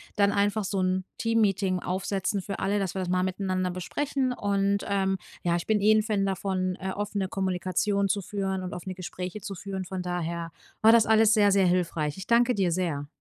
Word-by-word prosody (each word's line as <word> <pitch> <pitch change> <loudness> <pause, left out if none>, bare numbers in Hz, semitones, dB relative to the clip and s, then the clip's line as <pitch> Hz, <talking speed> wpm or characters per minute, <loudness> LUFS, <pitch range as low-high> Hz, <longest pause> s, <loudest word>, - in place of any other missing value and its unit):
dann 200 -1 +3
einfach 205 +1 +1
so 195 0 -2
'n 185 0 +1
Teammeeting 200 -5 +1
aufsetzen 195 +2 -2
für 195 +1 -5
alle, 200 +2 0
dass 195 -2 -2
wir 190 - -2
das 180 - -3
mal 180 0 +2
miteinander 185 -1 -1
besprechen. 260 +9 -2
Und, 200 -2 0
ähm, 195 -1 +1 0.3
ja, 170 -1 +2
ich 170 - -6
bin 215 -2 +2
eh 210 +2 +5
'n 215 0 +3
Fan 210 -2 0
davon, 190 -1 -1
äh, 190 0 -3
offene 200 -1 -2
Kommunikation 190 +2 0
zu 200 +1 0
führen 190 0 -3
und 180 - -5
offene 185 +1 -6
Gespräche 185 +2 -6
zu 195 +1 -6
führen. 190 +1 -5
Von 190 0 -4
daher 170 -1 -3 0.3
war 220 - +7
das 230 -1 +6
alles 220 0 +5
sehr, 205 -2 +4
sehr 195 -1 +4
hilfreich. 165 -4 0
Ich 190 - -8
danke 240 +1 +4
dir 190 -4 +1
sehr. 165 -5 -1
195 Hz, 205 wpm, -27 LUFS, 185-205 Hz, 0.3 s, war